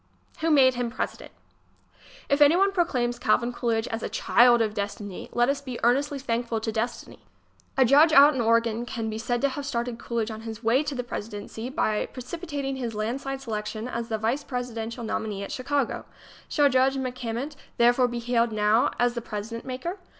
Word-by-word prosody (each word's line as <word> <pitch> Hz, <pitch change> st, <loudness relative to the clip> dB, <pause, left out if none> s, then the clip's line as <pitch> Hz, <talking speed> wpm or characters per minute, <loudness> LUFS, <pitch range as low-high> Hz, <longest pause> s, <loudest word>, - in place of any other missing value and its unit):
Who 330 Hz, -, 0 dB
Made 270 Hz, -4 st, +6 dB
Him 245 Hz, -1 st, -2 dB
President? 230 Hz, -, -5 dB, 1.0 s
If 280 Hz, +1 st, +1 dB
anyone 350 Hz, +7 st, +6 dB
proclaims 250 Hz, -10 st, 0 dB
Calvin 240 Hz, +2 st, +1 dB
Coolidge 230 Hz, -2 st, -1 dB
a 225 Hz, 0 st, -3 dB
"child 240 Hz, +2 st, +4 dB
of 220 Hz, -2 st, +1 dB
destiny," 205 Hz, -1 st, -5 dB
let 240 Hz, 0 st, +2 dB
us 280 Hz, +1 st, 0 dB
be 255 Hz, -3 st, -6 dB
earnestly 275 Hz, +4 st, +2 dB
thankful 235 Hz, -3 st, -2 dB
to 220 Hz, -, -2 dB
Destiny. 225 Hz, +2 st, -4 dB, 0.6 s
A 265 Hz, -, +6 dB
judge 290 Hz, +6 st, +6 dB
out 290 Hz, 0 st, +8 dB
in 260 Hz, -, -1 dB
Oregon 230 Hz, 0 st, +2 dB
can 225 Hz, -3 st, -3 dB
be 220 Hz, -, -4 dB
said 240 Hz, +1 st, -1 dB
to 280 Hz, -, +3 dB
have 285 Hz, +2 st, -5 dB
started 235 Hz, -3 st, -3 dB
Coolidge 230 Hz, -2 st, -2 dB
on 220 Hz, 0 st, -7 dB
his 225 Hz, 0 st, -8 dB
way 235 Hz, +5 st, +3 dB
to 290 Hz, -, -3 dB
the 250 Hz, -, -2 dB
presidency, 220 Hz, +1 st, -6 dB
by 215 Hz, -5 st, 0 dB
precip 255 Hz, +7 st, -7 dB
itating 280 Hz, -5 st, -3 dB
his 235 Hz, -3 st, -4 dB
landslide 265 Hz, +5 st, -3 dB
selection 215 Hz, -1 st, -4 dB
as 235 Hz, -1 st, -4 dB
the 220 Hz, -, 0 dB
vice 230 Hz, +7 st, -1 dB
presiden 245 Hz, -3 st, -4 dB
tial 235 Hz, 0 st, -7 dB
nominee 215 Hz, -2 st, -3 dB
at -, -, -7 dB
Chicago. 275 Hz, 0 st, -1 dB, 0.4 s
Shall 290 Hz, -2 st, +4 dB
Judge 265 Hz, 0 st, +3 dB
MacCammant 255 Hz, +2 st, -4 dB, 0.2 s
therefore 245 Hz, +1 st, +4 dB
be 240 Hz, 0 st, -4 dB
hailed 235 Hz, -1 st, +1 dB
now 215 Hz, +2 st, +3 dB
as 245 Hz, 0 st, +2 dB
the 235 Hz, -, -4 dB
president 225 Hz, +1 st, -6 dB
maker? 270 Hz, +9 st, -5 dB
240 Hz, 185 wpm, -26 LUFS, 225-270 Hz, 1.0 s, out